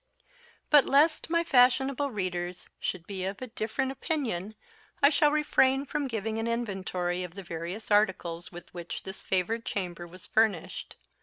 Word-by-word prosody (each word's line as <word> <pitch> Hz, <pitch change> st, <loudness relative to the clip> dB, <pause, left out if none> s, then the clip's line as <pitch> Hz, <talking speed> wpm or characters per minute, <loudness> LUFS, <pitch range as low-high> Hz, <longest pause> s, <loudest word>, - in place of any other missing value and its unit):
But 295 Hz, -2 st, +8 dB
lest 310 Hz, +4 st, +3 dB
my 335 Hz, 0 st, +2 dB
fashionable 270 Hz, 0 st, +3 dB
readers 180 Hz, -5 st, -3 dB
should 175 Hz, -3 st, -3 dB
be 190 Hz, -1 st, -4 dB
of 195 Hz, +1 st, -3 dB
a 255 Hz, -, -4 dB
different 235 Hz, +3 st, -2 dB
opinion, 235 Hz, -, -2 dB, 0.4 s
I 280 Hz, +1 st, +6 dB
shall 300 Hz, 0 st, +4 dB
refrain 280 Hz, -3 st, +3 dB
from 290 Hz, 0 st, -2 dB
giving 220 Hz, -2 st, -2 dB
an 225 Hz, -, -1 dB
inventory 190 Hz, -6 st, -2 dB
of 180 Hz, -1 st, -8 dB
the 195 Hz, -, -7 dB
various 175 Hz, +6 st, -5 dB
articles 180 Hz, -5 st, +1 dB
with 175 Hz, -1 st, -11 dB
which 175 Hz, -1 st, -6 dB
this 190 Hz, -, -6 dB
favoured 205 Hz, +5 st, 0 dB
chamber 175 Hz, -5 st, -3 dB
was 180 Hz, +2 st, -11 dB
furnished. 215 Hz, -7 st, 0 dB
215 Hz, 155 wpm, -29 LUFS, 180-265 Hz, 0.4 s, But